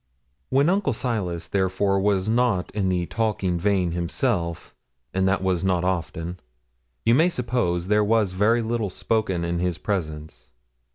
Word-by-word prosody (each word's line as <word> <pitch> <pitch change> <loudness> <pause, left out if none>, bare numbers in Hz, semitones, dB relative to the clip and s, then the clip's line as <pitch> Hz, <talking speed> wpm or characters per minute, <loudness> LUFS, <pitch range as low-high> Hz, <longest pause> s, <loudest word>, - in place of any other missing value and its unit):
When 140 +3 +3
Uncle 190 -5 +2
Silas, 105 -9 -2
therefore, 95 +1 +1
was 100 -1 +1
not 115 -5 +1
in 95 -2 0
the 90 -1 0
talking 100 -5 -1
vein 95 -2 +1
himself 85 - -2 0.4
and 95 0 +1
that 95 0 +1
was 95 -1 0
not 90 -2 +1
often 90 -1 -3 0.7
you 115 - +5
may 160 +8 +4
suppose 120 - -1
there 105 +1 +3
was 105 -2 +2
very 110 +5 +2
little 110 -2 -1
spoken 95 -3 -1
in 85 0 -1
his 90 -2 -1
presence. 80 - -4
95 Hz, 150 wpm, -24 LUFS, 90-110 Hz, 0.7 s, you